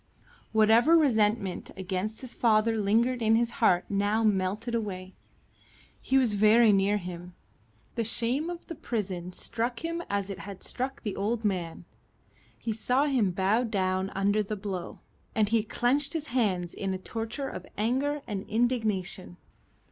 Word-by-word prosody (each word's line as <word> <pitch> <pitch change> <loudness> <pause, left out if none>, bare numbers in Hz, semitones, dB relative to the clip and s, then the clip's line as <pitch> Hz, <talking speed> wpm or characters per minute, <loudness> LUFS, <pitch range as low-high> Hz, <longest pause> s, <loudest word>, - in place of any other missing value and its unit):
Whatever 225 +9 +5
resentment 215 - +1
against 190 +3 -3
his 255 -2 -6
father 225 -1 +3
lingered 230 +4 +2
in 220 0 +4
his 235 +1 +1
heart 180 -5 +4
now 205 +2 +1
melted 205 +2 0
away. 190 -5 -3 0.9
He 270 - +2
was 250 -5 +3
very 215 +2 +6
near 200 +1 +3
him. 180 -1 -8 0.6
The 230 - -1
shame 240 +8 0
of 350 -1 -7
the 335 - -6
prison 190 - -4
struck 235 - -3
him 335 +1 -2
as 200 -1 -1
it 195 - -6
had 200 -2 -9
struck 260 +2 -4
the 210 -4 -3
old 220 +3 -1
man. 175 -4 -2 0.7
He 225 - -3
saw 250 +6 +1
him 255 -9 +2
bowed 200 +6 +1
down 190 -2 0
under 200 +2 +2
the 210 +1 -3
blow, 195 -3 -5 0.3
and 215 -2 +2
he 225 0 +3
clenched 250 +7 +1
his 315 -2 -3
hands 190 -8 0
in 195 -1 -2
a - - -3
torture 225 +7 -4
of - - -7
anger 270 +7 0
and 200 -3 -5
indignation. 215 - -1
215 Hz, 155 wpm, -28 LUFS, 195-240 Hz, 0.9 s, very